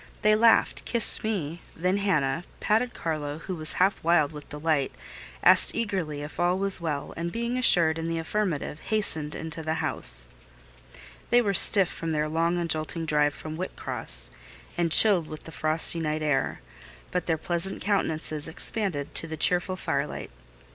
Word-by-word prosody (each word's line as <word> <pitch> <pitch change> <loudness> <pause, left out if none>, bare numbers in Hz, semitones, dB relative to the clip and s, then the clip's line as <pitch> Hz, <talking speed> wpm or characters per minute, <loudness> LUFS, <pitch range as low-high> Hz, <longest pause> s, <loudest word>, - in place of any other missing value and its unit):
They 215 0 +4
laughed—kissed 230 +1 +1
me—then 180 -2 -3
Hannah: 165 -7 -1 0.2
patted 230 +3 0
Carlo, 150 -3 -4
who 185 +4 -7
was 155 -1 +3
half 190 +2 0
wild 165 -3 +2
with 150 -2 -12
delight; 150 -2 -1 0.5
asked - - +5
eagerly 180 -10 -3
if 150 - -10
all 175 +1 +1
was 195 -2 -1
well; 150 -4 -4
and 170 +1 -4
being 235 +3 -3
assured 170 -10 +4
in 165 - -4
the 165 0 -3
affirmative, 165 -3 -3
hastened 160 -9 -1
into 160 0 -6
the 160 0 -3
house. 155 - +1 1.0
They 240 - +4
were 205 -5 0
stiff 195 -1 +5
with 165 -1 -3
their 150 0 -1
long 165 +2 -1
and 170 -1 -2
jolting 160 +1 -2
drive 150 -1 +1
from 155 0 -8
Whitcross, 175 - +1 0.4
and 170 -1 -1
chilled 185 -4 +8
with 155 0 -10
the 160 - -11
frosty 160 +2 +2
night 155 -1 -3
air; 140 - -1 0.5
but 180 -2 -3
their 165 -2 0
pleasant 175 +4 -2
countenances 160 -6 -2
expanded 160 -3 -2
to 165 - -3
the 160 0 -7
cheerful 180 +3 +1
firelight. 140 - -4
165 Hz, 160 wpm, -26 LUFS, 155-190 Hz, 1.0 s, chilled